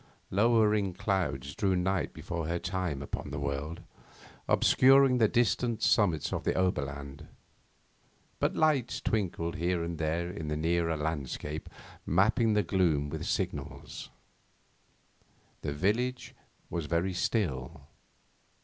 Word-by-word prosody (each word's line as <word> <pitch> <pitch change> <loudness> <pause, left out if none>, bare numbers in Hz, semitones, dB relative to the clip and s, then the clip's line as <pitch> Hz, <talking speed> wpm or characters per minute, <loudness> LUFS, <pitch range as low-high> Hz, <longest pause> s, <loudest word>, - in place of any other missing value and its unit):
Lowering 105 -2 +3
clouds 90 -9 -1
drew 95 +2 +1
night 95 0 0
before 85 -3 -5
her 85 +1 0
time 90 -6 -3
upon - - -5
the 75 - -5
world, 70 +4 -3 0.7
obscuring 135 -1 +5
the 110 - +5
distant 115 0 +1
summits 95 -7 +2
of - - -2
the - - 0
Oberland, 70 -4 -2 1.1
but - - +1
lights 145 -6 +2
twinkled 85 -6 -1
here 85 +1 0
and 85 -1 -4
there 80 +2 -1
in 80 -5 -6
the 75 0 -1
nearer 85 0 +1
landscape, 75 0 -4 0.3
mapping 110 - +3
the 105 0 +3
gloom 80 -6 +1
with 80 0 -4
signals. - - -4 1.5
The - - -3
village 110 - -1 0.4
was 85 -3 -2
very 85 +4 0
still. 80 - -1
85 Hz, 120 wpm, -30 LUFS, 75-105 Hz, 1.5 s, obscuring